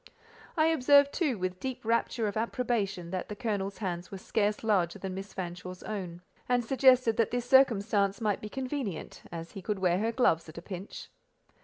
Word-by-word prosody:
I 315 - +5
observed, 285 -2 +5
too, 290 - 0
with 185 -1 -3
deep 260 -1 -5
rapture 230 0 +1
of 205 - -3
approbation, 215 -6 -1
that 185 -1 -3
the 210 - -5
colonel's 200 -3 -2
hands 180 -4 -4
were 195 - -7
scarce 210 +2 -1
larger 190 -6 +1
than 190 -1 -5
Miss 195 +2 -6
Fanshawe's 180 0 -6
own, 180 -5 -5 0.3
and 245 -1 +2
suggested 255 -2 +4
that 230 - +3
this 245 0 -2
circumstance 210 -6 +4
might 210 -4 0
be 210 - -6
convenient, 260 - -4
as 165 0 -6
he 195 - -8
could 210 +2 -2
wear 180 -1 +2
her 225 +2 0
gloves 165 -10 +2
at 155 - -12
a - - -5
pinch. 190 +1 -8
210 Hz, 185 wpm, -30 LUFS, 185-245 Hz, 0.3 s, I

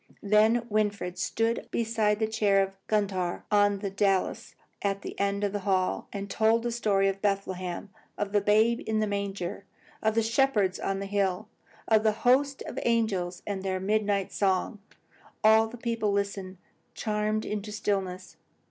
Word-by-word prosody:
Then 215 +3 +4
Winfried 205 -4 -1
stood 225 +1 -1
beside 220 -2 +1
the 220 - +1
chair 205 -3 +3
of 195 0 -5
Gundhar, 195 -4 -1
on 205 -1 +4
the 195 -1 -4
dais 195 -1 0 0.3
at 200 0 -1
the - - -5
end 200 0 0
of 205 -1 0
the 205 - -1
hall, 185 -1 0
and 200 -1 -5
told 220 +3 +2
the 240 - -1
story 205 -4 +2
of 195 0 -2
Bethlehem; 190 -2 -2 0.3
of 205 -1 -2
the 205 0 +3
babe 220 +3 +3
in 220 0 +1
the 215 - +2
manger, 200 -2 -3 0.4
of 220 0 +1
the 225 - +3
shepherds 225 -5 +2
on 195 0 -2
the - - -3
hills, 195 0 0 0.4
of 220 -1 +4
the 215 -1 +2
host 275 +3 +3
of - - -5
angels 195 -7 0
and 200 -2 -3
their 190 -1 -2
midnight 205 0 0
song. 195 +2 0 0.6
All 220 +1 +6
the 235 +2 -10
people 230 -3 -1
listened, 200 -2 -2 0.4
charmed 215 0 -1
into 210 0 -4
stillness. 195 -3 -3
205 Hz, 165 wpm, -28 LUFS, 195-220 Hz, 0.6 s, All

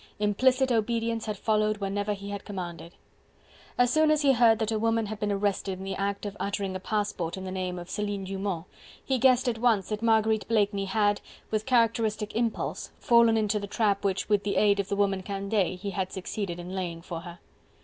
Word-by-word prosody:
Implicit 255 +6 +2
obedience 230 0 0
had 210 -1 -3
followed 215 0 +1
whenever 205 +1 -1
he 200 0 -7
had 200 -1 -5
commanded. 175 -3 -7 0.8
As 245 0 +3
soon 310 0 +4
as 305 -1 +3
he 275 - +6
heard 230 -2 +5
that 220 0 -1
a 220 - 0
woman 225 0 +1
had 215 0 -6
been 210 -1 -1
arrested 200 -1 -1
in 190 - -8
the 195 - -3
act 200 +1 -2
of 205 -1 -5
uttering 200 -1 -2
a - - -3
passport 195 -4 -2
in 190 - -6
the 185 - -5
name 185 -1 -3
of 175 0 -7
Celine 205 0 -3
Dumont, 190 -3 -3 0.4
he 265 -2 +1
guessed 255 +1 +4
at 230 -2 0
once 225 -5 +2
that 215 0 -3
Marguerite 220 -1 +2
Blakeney 205 -3 +1
had, 205 +1 +1 0.3
with 215 +2 -1
characteristic 225 -3 +1
impulse, 230 -1 -2
fallen 235 -1 +4
into 210 -1 +1
the 200 - -5
trap 205 -1 +1
which, 195 -1 0
with 205 -1 +2
the 205 - -1
aid 200 -1 +4
of 200 0 -2
the 200 - 0
woman 200 -1 +1
Candeille, 195 -1 -1
he 200 +2 -5
had 190 -1 -2
succeeded 190 -1 -4
in 175 +1 -7
laying 175 -3 -4
for 170 -2 -5
her. 175 0 -10
205 Hz, 210 wpm, -28 LUFS, 195-225 Hz, 0.8 s, he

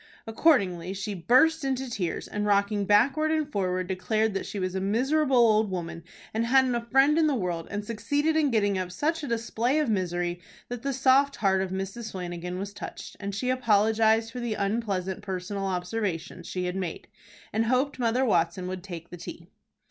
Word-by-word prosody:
Accordingly 195 - +2
she 200 +2 -4
burst 260 - +3
into 265 -1 -1
tears, 190 -8 -3
and, 210 - -3
rocking 200 0 +2
backward 265 +10 +3
and 310 -2 +1
forward, 185 -4 -1
declared 215 +4 0
that 195 - -3
she - - -6
was 185 -1 -2
a 190 - -2
miserable 260 +7 +2
old 220 -3 +4
woman, 170 -2 -5 0.3
and 220 +1 0
hadn't 260 0 +4
a 235 - 0
friend 270 +6 +3
in 315 - +4
the 290 - +1
world, 175 -6 -2
and 205 +1 -4
succeeded 285 +8 0
in 310 -3 +3
getting 205 -5 +1
up 180 -1 -4
such 315 - -1
a 290 - -5
display 235 +3 0
of 300 -7 +1
misery 175 -2 -1 0.3
that 245 -1 -5
the 275 +2 -1
soft 270 +1 +3
heart 190 -2 +2
of 190 - -2
Mrs. 195 +4 -5
Flanagan 180 -1 -5
was 200 +1 -5
touched, - - -8
and 200 -1 -4
she 250 +4 0
apologized 225 -1 +3
for 250 - -6
the 235 -3 -2
unpleasant 200 -3 -2
personal 195 +1 -4
observations 180 -2 -3
she 180 -1 -3
had 180 0 -2
made, 185 -4 -4 0.5
and 220 +2 +1
hoped 260 +3 +1
Mother 245 +2 +2
Watson 175 -3 +1
would 185 0 -4
take 170 -3 -9
the 175 - -7
tea. 170 0 -9
210 Hz, 190 wpm, -27 LUFS, 185-250 Hz, 0.5 s, old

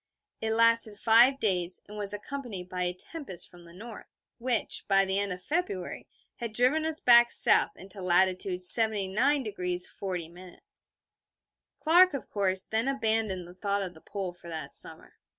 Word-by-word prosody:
It 220 0 -2
lasted 230 -2 +3
five 240 +6 +4
days, 180 -6 -1
and 210 - -12
was 205 -1 -3
accompanied 205 -3 -5
by 180 0 -4
a 180 - -1
tempest 225 - -6
from 175 -1 -17
the 170 - -16
north, 215 +5 -12 0.3
which, 235 -2 -1
by 195 -1 +2
the 190 +1 0
end 200 -1 -3
of 180 0 -8
February, 295 - -5 0.3
had 235 -3 -7
driven 265 +7 +1
us 320 -1 -1
back 240 -1 +5
south - - +3
into 195 +1 -10
latitude 185 0 0
79° 210 -2 +3
40'. 180 -1 -8 1.2
Clark, 350 +2 +4
of 275 - -8
course, 190 -2 +2
then 225 +3 -2
abandoned 220 -8 -2
the 175 - -14
thought 200 +2 -3
of 180 -2 -8
the 160 - -18
Pole 190 -3 -7
for 175 -1 -14
that 155 -4 -8
summer. - - +1
200 Hz, 160 wpm, -27 LUFS, 180-235 Hz, 1.2 s, back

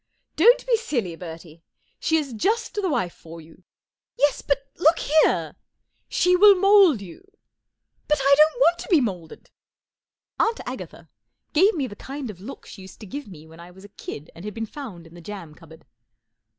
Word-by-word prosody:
" - - -52
Don't - - +6
be - - +3
Silly, 240 - -3
Bertie, 165 -1 -11 0.4
She 320 -2 +1
is 285 -5 -3
just 440 - -1
the 415 - -2
wdfe 250 - -1
for 165 0 -13
you," 160 +3 -17 0.6
"Yes, 290 0 +2
but 275 -1 -1
look 330 -1 +4
here 310 +2 +2 0.3
" - - -49
"She 360 0 +4
will 400 +2 +7
mould 390 - +5
you/' 180 -4 -11
14 390 +1 -29 0.8
But 300 - +2
1 275 -1 -1
don't 305 +2 +5
w 255 - +2
ant 345 - -19
to - - -8
be 345 -6 +5
moulded." 185 - -5 0.9
Aunt 455 +1 +1
Agatha - - -8 0.5
gave 380 +7 +4
me 285 -5 -1
the 205 - -8
kind 270 0 -7
of 185 -3 -16
look 255 +8 -10
she 195 - -12
used 190 - -13
to - - -8
give 285 +7 -7
me 160 -6 -13
when 160 +1 -16
I 170 +1 -12
was 190 +2 -15
a - - -14
kid 155 -6 -9
and 170 - -12
had 210 -1 -7
been 225 0 -3
found 215 - -9
in 165 - -16
the 175 - -12
jam 175 -4 -9
cupboard. 160 0 -17
245 Hz, 205 wpm, -23 LUFS, -, 0.9 s, will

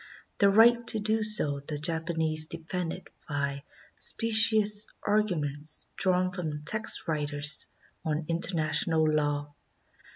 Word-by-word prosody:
Their 200 - +4
right 235 +3 +4
to 220 - +3
do 215 +1 -1
so 210 -10 0
the 145 +2 -7
Japanese 160 0 -2
defended 170 +2 -6 0.2
by 140 -1 -3 0.4
specious 220 -2 +4 0.2
arguments 155 -8 -1
drawn 185 -1 0
from 155 -5 -6
text 215 +8 +1
writers 150 -1 0 0.4
on 155 0 -3
international 165 -1 +1
law. 145 -1 -2
165 Hz, 105 wpm, -27 LUFS, 150-205 Hz, 0.4 s, Their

